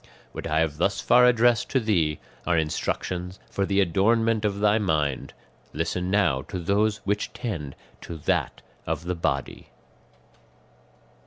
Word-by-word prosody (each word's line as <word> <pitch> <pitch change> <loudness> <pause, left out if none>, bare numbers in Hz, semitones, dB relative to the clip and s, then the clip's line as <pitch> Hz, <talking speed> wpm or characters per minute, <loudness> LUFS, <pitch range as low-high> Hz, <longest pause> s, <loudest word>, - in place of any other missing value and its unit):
"What - - -6
I 80 +1 +1
have 80 -2 -1
thus 95 +5 +1
far 125 0 +5
addressed 120 -1 +3
to 135 - +2
thee 85 - +1 0.3
are 90 -1 +3
instructions 90 +3 -2
for 100 -1 -1
the 100 0 +1
adornment 110 +5 +2
of 100 -1 0
thy 105 +1 +3
mind; 75 -9 -1 0.4
listen 90 +2 -2
now 90 -10 +2
to 75 +6 -7
those 100 +4 +1
which 105 +1 -1
tend 100 - -5 0.3
to 85 - -7
that 75 - -1 0.2
of 80 -1 -2
the 90 +1 -2
body." 70 -5 -3
95 Hz, 145 wpm, -25 LUFS, 80-105 Hz, 0.4 s, far